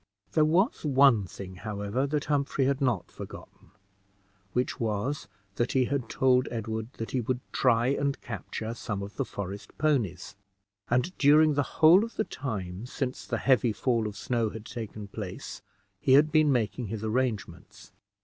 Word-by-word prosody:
There 155 -1 +4
was 180 - +2
one 135 -7 +5
thing, 95 0 -9
however, 105 +5 -2
that 150 +1 -1
Humphrey 140 -2 +1
had 140 +1 0
not 120 -9 0
forgotten, - - -11 0.8
which 125 +4 -1
was, 115 +6 -2 0.3
that 120 - 0
he 130 -1 +3
had 130 -3 -2
told 130 -1 +3
Edward 110 0 -4
that 115 - -6
he 130 - 0
would 125 +2 -1
try 120 -2 +3
and 140 0 0
capture 110 0 -5
some 105 -4 -4
of 100 0 -9
the - - 0
forest 100 0 -7
ponies; 115 - 0 0.5
and 125 +10 +1
during 150 +1 +6
the 145 - +2 0.2
whole 170 +6 +8
of 230 - -6
the - - +1
time 105 -5 -5
since 130 0 -4
the - - -1
heavy 125 -4 +3
fall 115 -2 0
of 105 -1 -7
snow 115 0 0
had 110 0 -9
taken 110 -3 -7
place 100 -3 -7 0.4
he 130 - +3
had 150 +3 +6
been 155 -1 +4
making 120 -1 0
his 110 +1 -5
arrangements. 110 -7 -3
120 Hz, 165 wpm, -28 LUFS, 105-140 Hz, 0.8 s, whole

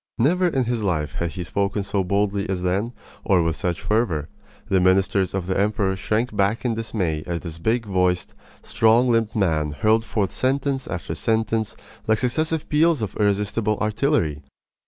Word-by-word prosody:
Never 175 +10 +3
in 135 -6 +1
his 120 -1 -1
life 80 -6 -1
had 85 -2 -2
he 90 - -4
spoken 100 +3 -1
so 100 0 -1
boldly 100 +2 0
as 90 -2 -2
then, 100 +6 0 0.3
or 95 -4 +3
with 80 -1 0
such 90 -4 -3
fervor. 95 -9 0 0.4
The 95 -3 +2
ministers 95 +1 +2
of 95 -2 -2
the 95 +1 -1
emperor 100 -1 +1
shrank 110 +4 -1
back 100 +5 +1
in 120 - +1
dismay 100 -9 -2
as 85 -1 -3
this 85 -2 -7
big 115 +5 0
voiced, 90 -3 0 0.3
strong 115 +3 +3
limbed 115 0 +1
man 80 -7 +1
hurled 110 +6 +2
forth 105 -4 -2
sentence 135 0 0
after 85 -3 -4
sentence 110 +3 0 0.3
like 110 0 +3
successive 155 +6 -1
peals 155 -3 +3
of 105 - -5
irresistible 105 +1 +1
artillery. 105 - 0
105 Hz, 170 wpm, -23 LUFS, 90-115 Hz, 0.4 s, Never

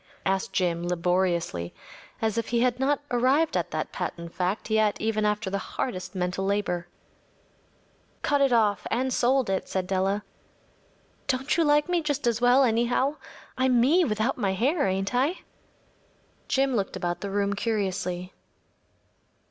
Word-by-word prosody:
‚ÄĚ - - -32 0.2
asked 195 0 -2
Jim, 170 -2 +1
laboriously, 175 - 0 0.5
as 220 -2 +1
if 230 -1 -1
he 235 0 +1
had 250 0 +1
not 280 +2 +1
arrived 265 +6 +2
at - - 0
that - - -3
patent 170 -1 -5
fact 185 +5 -2
yet 215 -1 +2
even 215 -1 0
after 210 0 0
the 200 - -1
hardest 190 -4 -4
mental 180 +1 -1
labor. 195 -3 -1 1.4
“Cut 285 -1 +2
it 275 -2 +4
off 215 -4 +2
and 255 +2 0
sold 255 +1 +2
it,‚ÄĚ 190 -1 -1
said 190 -1 -2
Della. 195 +2 0 1.0
“Don’t 265 0 0
you 335 - +3
like 295 0 +3
me 355 -1 +1
just 290 -5 -2
as 235 -1 +1
well, 245 +2 +5
anyhow? 245 +4 +1 0.4
I’m 255 -2 +3
me 310 +10 +4
without 225 -1 0
my 195 -4 +1
hair, 275 - +1
ain’t 195 +2 -1
I?‚ÄĚ 275 +9 +1 1.1
Jim 270 -1 +1
looked 200 -3 -1
about 175 0 -3
the 200 - -3
room 200 0 0
curiously. 190 -4 -2
220 Hz, 155 wpm, -26 LUFS, 190-260 Hz, 1.4 s, well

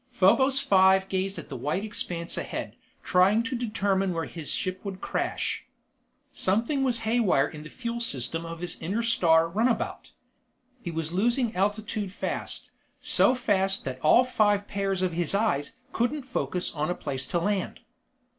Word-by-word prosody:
_ - - -20
Probos 265 +8 +5
Five 190 -3 +4
gazed 190 +1 -1
at - - -8
the 135 - -6
white 150 - -2
expanse 175 -5 -4
ahead, - - -5 0.3
trying 195 +5 +4
to 260 +1 -3
determine 200 -5 0
where 165 -1 -2
his 160 -4 -5
ship 185 0 -2
would 195 -2 -5
crash. - - -2 0.7
Something 230 +9 +1
was 245 -3 +1
haywire 220 - +2
in 150 - -9
the 155 - -10
fuel 235 +2 -4
system 165 - -1
of 165 0 -7
his 180 - -2
Interstar 170 -4 +2
Runabout. 225 +7 -1 0.7
He 175 - -5
was 165 0 -3
losing 235 +4 +1
altitude 205 +1 -1
fast, - - -4 0.3
so 255 - +4
fast 195 -5 +1
that 130 -1 -4
all 195 +11 +6
five 205 -4 +2
pairs 195 -2 -1
of 180 -2 0
his 175 +2 0
eyes 200 - 0 0.2
couldn't 265 +5 0
focus 215 -8 -2
on 150 +1 -2
a 180 - 0
place 130 -1 -4
to - - -1
land. 200 +1 -2
195 Hz, 160 wpm, -27 LUFS, 170-230 Hz, 0.7 s, all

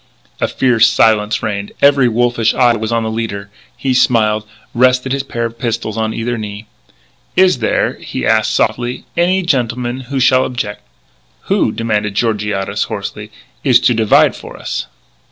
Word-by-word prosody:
A - - +1
fierce 120 -3 +3
silence 105 -1 +2
reigned. 100 -2 -3
Every 140 -2 +5
wolfish 120 -1 +1
eye 120 -2 +4
was 110 0 -3
on 115 -1 +1
the 110 - -2
leader. 100 -3 -4 0.3
He 135 -1 -1
smiled, 110 -4 +2 0.3
rested 125 +1 +2
his 135 0 0
pair 120 -3 -4
of 115 0 -7
pistols 115 -2 -2
on 110 -1 -1
either 115 +1 -3
knee. 105 0 -7 0.7
"Is 185 -7 +4
there," 110 - 0
he - - -4
asked 110 0 +2
softly, 120 +3 -1
"any 185 +2 +2
gentleman 125 -5 -1
who 140 -1 -1
shall 130 0 +4
objec'?" 115 -5 -4 0.6
"Who," - - +1
demanded 105 -3 -2
Georgiades 105 -3 -1
hoarsely, 105 +1 -6 0.3
"is 125 -4 +5
to 125 - +3
divide 110 -2 +3
for - - -10
us?" - - -4
115 Hz, 155 wpm, -15 LUFS, 110-125 Hz, 0.7 s, Every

